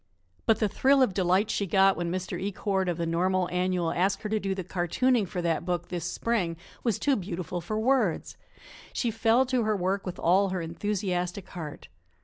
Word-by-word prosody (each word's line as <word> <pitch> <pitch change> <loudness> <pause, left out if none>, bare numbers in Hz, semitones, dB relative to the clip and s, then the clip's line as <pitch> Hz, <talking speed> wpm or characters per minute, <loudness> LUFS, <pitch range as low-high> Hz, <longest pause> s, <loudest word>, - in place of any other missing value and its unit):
But 225 - +5
the 215 - +1
thrill 265 +6 +4
of 205 - +1
delight 185 +3 +2
she 200 - -1
got 195 +1 +4
when 170 -1 -2
Mr. 185 0 -3
Ecord, 195 -1 -1
of 170 - -1
the 170 - -1
Normal 180 +2 +1
Annual, 180 -2 0
asked 195 +2 0
her 210 - -3
to 215 0 +1
do 195 -1 -2
the 190 - -4
cartooning 195 +7 +1
for 180 -3 -4
that 170 -1 0
book 175 -1 -2
this 175 -2 -3
spring, 185 -9 -1 0.3
was 230 -5 +1
too 280 -2 +2
beautiful 180 -3 -4
for 215 +6 -3
words. 230 -7 +1 0.6
She 235 - 0
fell 225 +3 +3
to 255 -1 +1
her 215 -2 +1
work 190 +2 -1
with 180 - -4
all 190 +4 +3
her 185 -1 -2
enthusiastic 180 +1 -2
heart. 155 -4 -7
190 Hz, 195 wpm, -28 LUFS, 175-215 Hz, 0.6 s, But